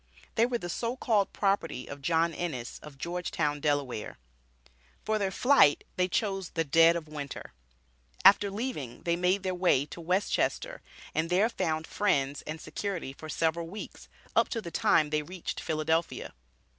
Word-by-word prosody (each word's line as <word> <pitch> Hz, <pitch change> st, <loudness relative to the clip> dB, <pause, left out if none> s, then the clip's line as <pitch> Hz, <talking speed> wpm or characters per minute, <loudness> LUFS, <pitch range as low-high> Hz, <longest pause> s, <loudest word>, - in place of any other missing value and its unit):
They 230 Hz, +2 st, +3 dB
were 245 Hz, -1 st, -1 dB
the 175 Hz, -, -6 dB
so 230 Hz, +7 st, -2 dB
called 210 Hz, -5 st, +2 dB
property 195 Hz, -10 st, 0 dB
of 145 Hz, 0 st, -9 dB
John 165 Hz, +2 st, +2 dB
Ennis, 145 Hz, -8 st, -4 dB
of 150 Hz, -2 st, -12 dB
Georgetown, 170 Hz, -2 st, -2 dB
Delaware. 145 Hz, -6 st, -1 dB, 0.9 s
For 215 Hz, 0 st, +1 dB
their 195 Hz, -2 st, +1 dB
flight 245 Hz, -, +4 dB
they 180 Hz, 0 st, +2 dB
chose 195 Hz, -3 st, -1 dB
the 165 Hz, -, -1 dB
dead 165 Hz, +3 st, +5 dB
of 165 Hz, -2 st, -4 dB
Winter. 145 Hz, -2 st, -7 dB, 0.7 s
After 200 Hz, 0 st, +7 dB
leaving 195 Hz, -, -5 dB
they 170 Hz, 0 st, +1 dB
made 180 Hz, +2 st, +1 dB
their 185 Hz, -1 st, -1 dB
way 175 Hz, -7 st, +3 dB
to 170 Hz, -, -9 dB
West 185 Hz, +5 st, 0 dB
Chester, -, -, -1 dB, 0.3 s
and 160 Hz, +1 st, 0 dB
there 195 Hz, +6 st, +3 dB
found 160 Hz, -7 st, -1 dB
friends 145 Hz, -10 st, 0 dB
and 155 Hz, +1 st, -4 dB
security 180 Hz, -9 st, -4 dB
for 155 Hz, +3 st, -10 dB
several 165 Hz, +1 st, 0 dB
weeks, 205 Hz, +5 st, -9 dB, 0.3 s
up -, -, +4 dB
to 230 Hz, -, -2 dB
the 170 Hz, -6 st, -7 dB
time 150 Hz, -2 st, +3 dB
they 150 Hz, 0 st, +1 dB
reached 175 Hz, +3 st, -6 dB
Philadelphia. 160 Hz, +1 st, -1 dB
170 Hz, 165 wpm, -29 LUFS, 150-195 Hz, 0.9 s, After